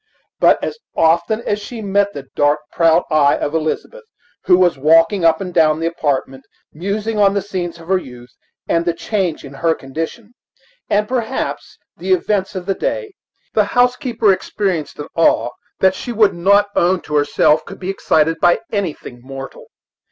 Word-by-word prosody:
But - - +5
as 460 - -4 0.2
often 170 +7 +2
as 205 -3 -2
she 230 +3 -8
met 200 -1 0
the 140 - -8
dark, 145 +1 +2
proud 165 +1 +3
eye 145 -2 +4
of 145 - -3
Elizabeth, 160 - -3 0.4
who 180 - +5
was 180 -3 +3
walking 165 +6 +3
up 165 -1 +4
and 185 -2 -6
down 155 -2 +3
the 165 - -2
apartment, 140 -5 -2 0.3
musing 205 +6 -3
on 200 -1 +4
the 200 - +1
scenes 180 -4 -5
of 165 - -13
her 190 0 +2
youth 125 -5 -12 0.4
and 165 - +1
the 170 -1 -1
change 180 -5 -2
in 140 - -10
her 160 +4 0
condition, 165 - -6 0.6
and 210 +1 +1
perhaps 250 +1 -3 0.2
the 375 - 0
events 205 - -1
of 185 -1 -5
the 195 - 0
day, 430 - -3 0.4
the - - +4
housekeeper 245 -4 +3
experienced 185 -3 -3
an 145 - -6
awe 165 -6 +3 0.3
that 190 0 +4
she 240 - -6
would 215 -3 +3
not 200 +4 +3
own 180 +1 +2
to 150 - -5
herself 150 +1 +3
could - - -11
be 190 +1 -3
excited 165 -3 +1
by 175 +3 +4
anything 170 - -4
mortal. 135 +1 -9
175 Hz, 175 wpm, -18 LUFS, 155-205 Hz, 0.6 s, But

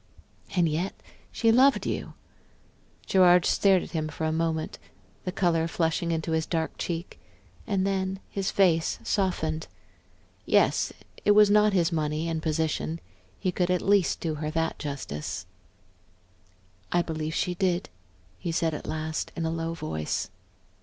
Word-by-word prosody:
"And 175 -2 +4
yet 165 +5 -1 0.4
she 225 -1 +3
loved 265 +4 +5
you?" - - -3 0.9
Gerard 180 -2 +5
stared 195 -2 +4
at - - -9
him 155 -2 -1
for 155 +1 -4
a 155 - +1
moment, 160 0 -1 0.5
the 185 - -1
color 165 -3 +1
flushing 165 +1 0
into 165 0 -1
his 160 0 0
dark 160 -2 -1
cheek. 170 +1 -4 0.5
And 195 -2 +1
then 190 -1 -1
his 195 -1 -2
face 170 -5 +3
softened. 160 -6 -1 0.8
Yes, - - +3 0.3
it 205 - +5
was 210 -1 +7
not 210 0 +5
his 175 -2 +2
money 155 0 -1
and 165 -1 -2
position 160 +1 -1 0.4
he 185 - 0
could 180 0 0
at 180 -1 +1
least 200 -2 +3
do 160 -2 -2
her 150 - -1
that 165 +1 -1
justice. 95 - -5 1.5
"I 175 0 +3
believe 155 -1 -3
she 180 - 0
did," 180 -1 0 0.5
he 170 - -3
said 165 -1 0
at 150 - -6
last 155 0 -3
in 165 - -2
a 160 - 0
low 165 0 -3
voice. 80 - -3
165 Hz, 150 wpm, -27 LUFS, 160-185 Hz, 1.5 s, was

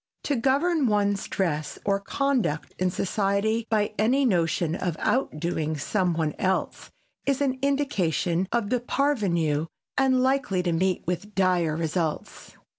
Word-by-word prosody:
To 285 - 0
govern 275 +4 +2
one's 205 -2 +1
dress 155 -5 -2
or 200 0 +2
conduct 245 - -1
in 185 0 +2
society 205 +4 0
by 215 -1 +1
any 255 +6 +3
notion 170 -5 +1
of 175 -2 -2
outdoing 160 - -1
some 180 +4 0
one 160 -2 0
else 190 0 -1 0.4
is 275 -2 +2
an 265 -2 0
indication 190 - 0
of 235 -2 0
the 250 - +2
parvenu 190 - 0 0.3
and 260 -1 +3
likely 260 -9 +1
to 175 - 0
meet 185 +2 0
with 190 +4 -4
dire 180 -5 +2
results. 165 -1 -3
200 Hz, 135 wpm, -26 LUFS, 170-255 Hz, 0.4 s, any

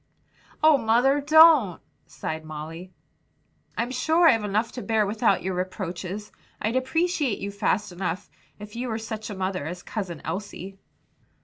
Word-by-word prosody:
"Oh, 310 -3 +6
mother, 245 +5 +3
don't!" 305 - +6 0.3
sighed 160 0 -5
Molly. 160 +4 -8 0.9
"I'm 240 +2 -1
sure 320 +7 +3
I've 225 -8 +4
enough 215 +3 0
to 250 - -6
bear 220 -2 +1
without 200 -1 +1
your 190 +1 -2
reproaches. 185 +2 -4 0.3
I'd 220 +3 -1
appreciate 280 - 0
you 200 - -5
fast 200 0 0
enough, 180 0 -4 0.3
if 210 +1 -10
you 250 +2 -3
were 220 -2 -2
such 220 -1 -6
a 205 - -5
mother 185 -5 -2
as 180 +2 -6
Cousin 190 -7 -5
Elsie." 195 -1 -6
210 Hz, 145 wpm, -25 LUFS, 185-245 Hz, 0.9 s, Oh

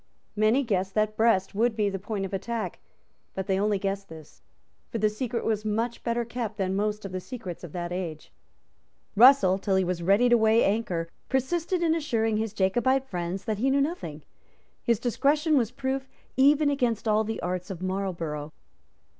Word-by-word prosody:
Many 220 +6 +3
guessed 195 -4 -1
that 215 0 +1
Brest 220 -4 +2
would 225 +3 +1
be 210 -2 +1
the 195 -1 -2
point 200 0 -3
of 195 - -7
attack; 215 0 -3 0.6
but 190 - -3
they 190 -1 +1
only 205 0 +2
guessed 195 0 -3
this; 160 -2 -13 0.5
for - - -2
the 215 -1 +2
secret 235 +2 -3
was 215 -1 0
much 225 +3 -2
better 235 0 -1
kept 230 -2 -4
than 190 -1 -1
most 210 +1 -1
of 195 - -5
the 185 - -3
secrets 185 -5 -8
of 175 - -8
that 175 -1 -4
age. 170 -4 -5 0.8
Russell, 215 -5 +6
till 195 -1 0
he 190 - +3
was 180 -1 -2
ready 200 +8 +4
to 240 -1 +5
weigh 220 +1 +4
anchor, 190 -6 0 0.2
persisted 340 +7 0
in 325 -1 +3
assuring 225 -9 0
his 220 -1 -1
Jacobite 240 +7 +1
friends 180 -3 -4
that 215 -3 -2
he 265 +4 +2
knew 275 +1 +3
nothing. 170 - -3 0.6
His 235 -2 +2
discretion 295 +6 +2
was 235 -6 +2
proof 265 +1 -3 0.3
even 285 +2 +4
against 240 -5 0
all 215 0 +3
the 220 0 -4
arts 180 +1 -3
of 185 -2 -6
Marlborough. 170 -6 -3
215 Hz, 185 wpm, -27 LUFS, 190-240 Hz, 0.8 s, Russell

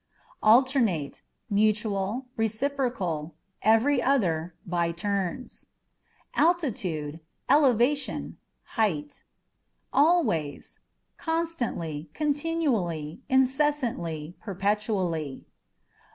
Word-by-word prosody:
Alternate 225 - +4
â€" - - -20 0.3
mutual, 210 +2 +1
reciprocal, 220 - -1 0.3
every 235 +5 +4
other, 175 -11 +1
by 170 -1 0
turns. 195 +5 -3 0.7
Altitudeâ€" 195 - 0 0.3
elevation, 275 0 +2 0.3
height. 160 - -2 0.7
Always 280 - +1
â€" - - -48
constantly, 240 - -2
continually, 280 - -1
incessantly, 255 - +1
perpetually. 195 - -1
215 Hz, 65 wpm, -27 LUFS, 170-270 Hz, 0.7 s, Alternate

